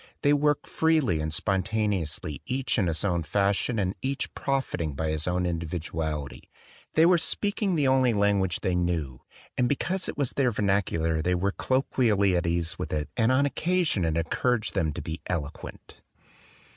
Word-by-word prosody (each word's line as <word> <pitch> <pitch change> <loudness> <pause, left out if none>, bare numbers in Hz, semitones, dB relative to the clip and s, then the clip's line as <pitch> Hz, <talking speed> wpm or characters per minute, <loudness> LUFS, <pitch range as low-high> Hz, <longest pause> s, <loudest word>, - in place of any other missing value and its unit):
They 145 - +5
worked 150 0 +2
freely 155 - +2
and 80 0 -2
spon 95 +4 +1
taneously 95 -7 -2
each 130 -1 0
in 95 - +2
his 80 +3 -1
own 90 -3 +1
fashion 100 +7 0
and 95 -2 0
each 135 +1 -2
profiting 90 - -2
by 80 +2 -2
his 80 +1 -1
own 90 0 0
individuality. 80 -3 -4 0.5
They 160 - +6
were 175 0 +5
speaking 205 +1 0
the 145 -4 +2
only 130 -2 +4
language 100 -4 +1
they 90 - 0
knew; 85 -8 -1 0.4
and 125 -1 +3
be 145 - +3
cause 185 +6 -1
it - - -6
was 140 -4 0
their 135 -3 +2
vernacular 95 -7 0
they 90 +3 +1
were 95 +3 0
collo 130 +6 0
quially 100 -7 +3
at 85 -1 0
ease 85 +1 -1
in 90 -4 -2
it 75 - -4
and 115 +1 +3
on 135 +2 +3
occasion 165 - +1
it 80 -1 0
encour 100 +9 +1
aged 110 - -5
them 85 -6 0
to - - -6
be 80 +1 -5
eloquent. 75 -5 -6
95 Hz, 185 wpm, -27 LUFS, 80-130 Hz, 0.5 s, They